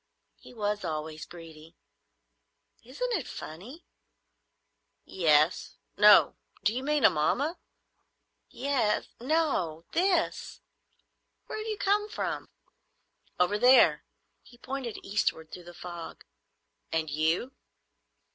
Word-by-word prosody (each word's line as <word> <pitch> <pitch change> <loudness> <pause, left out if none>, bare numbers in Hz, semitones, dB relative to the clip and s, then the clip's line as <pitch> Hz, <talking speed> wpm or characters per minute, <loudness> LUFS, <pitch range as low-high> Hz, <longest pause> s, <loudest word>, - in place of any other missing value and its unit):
He - - -15
was 210 -3 -2
always 155 -2 -5
greedy. 165 -1 -13 1.1
Isn't - - -4
it 350 - -1
funny?" 220 - -9 1.2
"Yes. 155 -2 +2 0.2
No. 210 0 +6 0.3
Do 215 0 +2
you 250 - -2
mean 295 +1 +1
Amomma?" 275 - +2 0.9
"Ye—es. 255 -5 0
No. 245 - 0
This. 355 -1 0 0.9
Where - - -6
have 430 - -5
you 430 -1 -3
come 415 +2 +1
from?" - - -4 0.9
"Over 180 +4 +2
there," 250 +3 +6 0.4
He 240 - -19
pointed 260 -2 -5
eastward 160 -5 -1
through 180 - -10
the 175 - -10
fog. 175 -1 -9 0.7
"And 160 -1 0
you?" 160 - 0
210 Hz, 100 wpm, -28 LUFS, -, 1.2 s, No